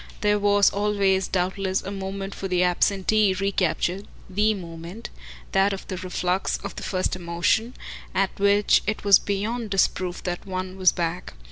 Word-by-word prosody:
There 210 0 +2
was 205 0 +4
always 200 -2 +1
doubtless 190 +1 -1
a 195 - -5
moment 195 0 -5
for 195 - -5
the 180 -1 +1
absentee 195 +3 +2
recaptured 190 0 -1 0.2
THE 210 +3 +1
moment, 170 +4 -8 0.4
that 195 +1 +3
of 195 - -7
the 185 - -3
reflux 180 0 -1
of 200 - -6
the - - -7
first 185 -1 -1
emotion 175 +7 0 0.4
at 195 0 +2
which 200 +1 +4
it 210 - -2
was 200 -2 +7
beyond 215 +3 -3
disproof 185 -2 0
that 175 -1 -3
one 185 0 -4
was 185 -1 +4
back. 170 - -3
195 Hz, 155 wpm, -24 LUFS, 185-200 Hz, 0.4 s, was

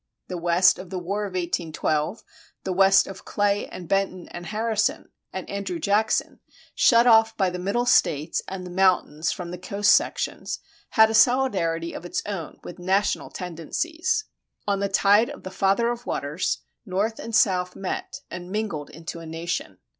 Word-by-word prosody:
The 180 - -3
West 175 +2 +4
of 185 - -9
the 190 - -4
War 200 +4 -2
of 195 - -7
1812, 170 0 -1 0.4
the 190 - -2
West 195 +1 +5
of 190 -1 -9
Clay, 205 0 0
and 175 - -9
Benton 195 -1 0
and 175 0 -8
Harrison, 220 0 -1 0.2
and 190 - -6
Andrew 195 -3 -3
Jackson, 205 +6 +1 0.3
shut 235 -1 +5
off 225 -1 +5
by 190 -2 +2
the 180 - -5
Middle 200 +7 0
States 155 - +2
and 190 -1 -6
the 180 - -8
mountains 175 -4 +2
from 175 -1 -6
the 180 - -6
coast 200 +2 +2
sections, - - +1 0.3
had 220 -2 +5
a - - -2
solidarity 205 -9 +2
of - - -7
its 175 - -3
own 190 -7 -5
with 175 - -9
national 190 +3 0
tendencies.[29:1] 325 - -4
On 200 - -1
the 200 0 0
tide 205 +3 +4
of - - -9
the 185 - -7
Father 195 +5 +2
of 240 0 -7
Waters, 150 +5 -2 0.2
North 210 +2 -1
and 230 - -4
South 180 -4 +2
met 230 +7 -5
and 180 0 -7
mingled 205 -9 -3
into 165 +1 -8
a 165 - -9
nation. 165 +2 -4
190 Hz, 170 wpm, -25 LUFS, 175-215 Hz, 0.4 s, West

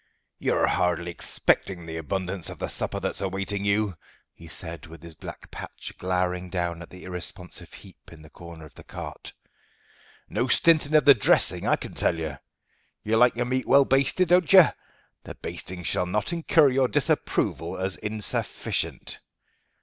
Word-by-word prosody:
"You're - - +2
hardly 85 0 0
expecting 85 +1 -1
the 80 0 -6
abundance 90 +1 -3
of - - -8
the - - -4
supper - - -3
that's - - -4
awaiting 100 +1 -2
you," 100 -2 +1 0.4
he 85 - -14
said, 80 -2 -7
with 80 0 -13
his 85 -1 -10
black 80 - -10
patch - - -8
glowering 90 0 -1
down 85 -2 -2
at 85 - -10
the 90 - -12
irresponsive 90 0 -6
heap - - -15
in 80 -2 -13
the 75 - -15
corner 85 -2 -11
of 75 - -16
the - - -14
cart. - - -8 1.0
"No 125 - -1
stinting 155 +2 +4
of 150 -3 +5
the 140 - +10
dressing, 110 - +3
I - - +4
can - - -8
tell 85 - +1
you. 80 -4 -4 0.7
You 110 +1 0
like 125 +1 +5
your 120 +1 -1
meat 130 +1 -1
well 140 0 +6
basted, 140 +7 +2
don't 180 -2 +4
you? 185 -4 +9 0.5
The - - -9
basting 90 0 -6
shall 90 - 0
not 105 - -1
incur 160 -3 +4
your 130 0 +2
disapproval - - 0
as 95 0 -1
insufficient. 105 -1 -2
95 Hz, 165 wpm, -26 LUFS, 85-125 Hz, 1.0 s, the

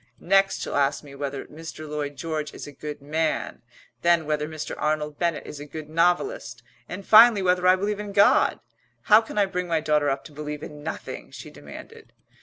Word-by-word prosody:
Next 195 +2 +2
she'll - - -4
ask 140 +1 +1
me 140 -2 -12
whether 140 0 -5
Mr. 155 0 -9
Lloyd 145 -1 -4
George 155 +1 -4
is - - -8
a 145 - -9
good 150 0 -8
man, 155 +2 -2 0.4
then 170 -2 +3
whether 150 0 -1
Mr. 155 -1 -6
Arnold 150 -1 -2
Bennett 170 -3 -1
is 150 - -8
a 145 - -8
good 155 +1 -8
novelist, 175 - 0 0.3
and 200 - -7
finally 220 -2 +7
whether 180 0 +2
I 185 - +7
believe 205 +2 -2
in 205 -1 -5
God. 200 +1 +4 0.5
How 215 - +9
can 220 - -9
I 205 - +4
bring 180 -2 -3
my 165 -2 +1
daughter 150 -2 +1
up 135 0 -2
to - - -12
believe 150 0 -6
in 150 -1 -9
nothing?" 160 +2 -6
she - - -10
demanded. 455 -1 -12
155 Hz, 200 wpm, -25 LUFS, 150-185 Hz, 0.5 s, How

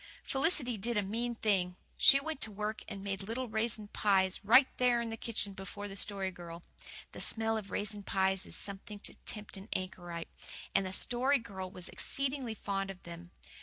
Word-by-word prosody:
Felicity 270 - +2
did 235 +3 0
a 205 - +3
mean 235 +4 -1
thing. 190 -5 +1 0.2
She 275 -2 +8
went 310 0 -4
to 220 - -1
work 210 +2 -3
and 195 - -6
made 195 -1 -2
little 230 +6 -3
raisin 220 -1 0
pies, 190 -3 +3
right 245 +7 +8
there 250 -1 +4
in 235 -1 -2
the - - -2
kitchen 215 -3 +1
before 195 +2 -6
the 195 - -7
Story 195 -1 0
Girl. 170 -1 -9 0.5
The - - -6
smell 225 0 +1
of 210 -3 -4
raisin 210 0 -2
pies 190 -1 +1
is - - -6
something 200 +1 -6
to 205 - -7
tempt 210 -2 -3
an 195 +3 -10
anchorite; 175 -2 -4 0.4
and 195 - +3
the - - -4
Story 250 +8 +3
Girl 190 -6 -6
was 180 -1 -6
exceedingly 270 -4 -1
fond 195 -1 -2
of 190 -1 -8
them. 170 0 -9
205 Hz, 190 wpm, -33 LUFS, 190-230 Hz, 0.5 s, She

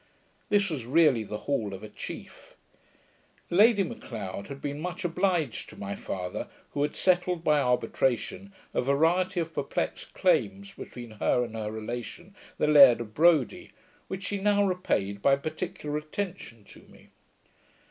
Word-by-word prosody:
This 200 -3 +2
was 130 -7 -4
really 145 -5 +4
the 105 0 -5
hall 110 -8 -1
of 95 - -11
a - - -6
chief. - - -9 1.0
Lady 205 +3 +5
M'Leod 100 - -6
had 140 0 -8
been 145 +1 -4
much 180 +2 -4
obliged 175 - 0
to - - -12
my 100 0 -4
father, 90 -1 -5 0.2
who 145 - -2
had 145 0 0
settled 180 -2 +1
by 150 -2 +4
arbitration, 130 - 0 0.2
a - - +1
variety 165 +8 +2
of 165 -1 -3
perplexed - - -3
claims 200 - +1
between 120 -2 -9
her 125 - +3
and 115 -2 -6
her 105 -1 -3
relation, 120 - -6 0.2
the - - +1
Laird 140 -5 +8
of 110 -2 -7
Brodie, 165 +3 +3 0.3
which 190 0 -5
she 200 0 -2
now 205 0 +3
repaid 100 - -1
by 135 +4 +5
particular 155 +1 -4
attention 155 - -6
to - - -15
me. - - -19
150 Hz, 150 wpm, -28 LUFS, 120-185 Hz, 1.0 s, Laird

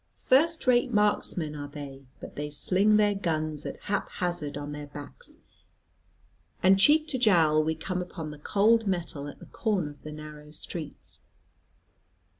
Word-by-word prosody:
First 320 +5 +3
rate 250 0 +3
marksmen 205 -7 +1
are 145 -1 -5
they, 140 -2 -9
but - - -10
they 150 0 -4
sling 195 +8 +3
their 210 -1 +4
guns 155 -5 -2
at - - -7
hap 205 -1 -2
hazard 175 -5 -3
on 145 0 -5
their 145 0 -7
backs, 145 0 -9 1.3
and 190 +1 +6
cheek 305 +8 +6
to 260 - +1
jowl 160 -9 +4
we 160 +1 0
come 180 +3 -3
upon 165 -3 -6
the 150 - -11
cold 220 +7 +3
metal 170 -6 -2
at 145 - -9
the - - -13
corner 195 -9 -1
of 145 - -17
the 155 - -8
narrow 150 0 -10
streets. 155 0 -8
165 Hz, 160 wpm, -28 LUFS, 150-205 Hz, 1.3 s, and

